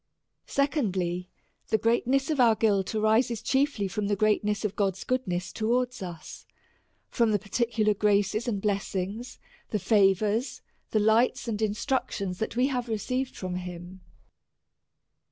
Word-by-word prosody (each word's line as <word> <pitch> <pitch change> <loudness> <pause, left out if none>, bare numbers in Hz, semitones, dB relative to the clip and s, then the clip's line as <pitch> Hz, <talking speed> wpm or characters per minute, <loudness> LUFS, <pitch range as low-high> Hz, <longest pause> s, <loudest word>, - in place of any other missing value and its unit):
Secondly, 190 - -1 0.4
The 220 - +2
greatness 255 +5 +1
of 300 - -1
our 235 -3 +6
guilt 205 -2 +1
arises 220 +1 +2
chiefly 265 -7 +1
from 210 +1 -2
the 205 - +1
greatness 210 0 +1
of 205 -1 -2
God's 195 -2 -1
goodness 190 -8 -2
towards 245 +2 0
us, 175 -3 -8 0.6
from 235 -3 +2
the - - +4
particular 215 +1 0
graces 205 +2 +1
and 210 -4 -1
blessings, 200 +2 -3 0.3
the 215 - 0
favours, 205 +3 +2 0.3
the 215 - +1
lights 220 +4 +2
and 220 -2 -2
instructions 210 -4 -1
that 220 - -2
w^e 250 +3 +2
have 245 -2 -2
received 255 +4 -2
from 180 -1 -4
him. 180 +1 -8
215 Hz, 135 wpm, -27 LUFS, 195-240 Hz, 0.6 s, our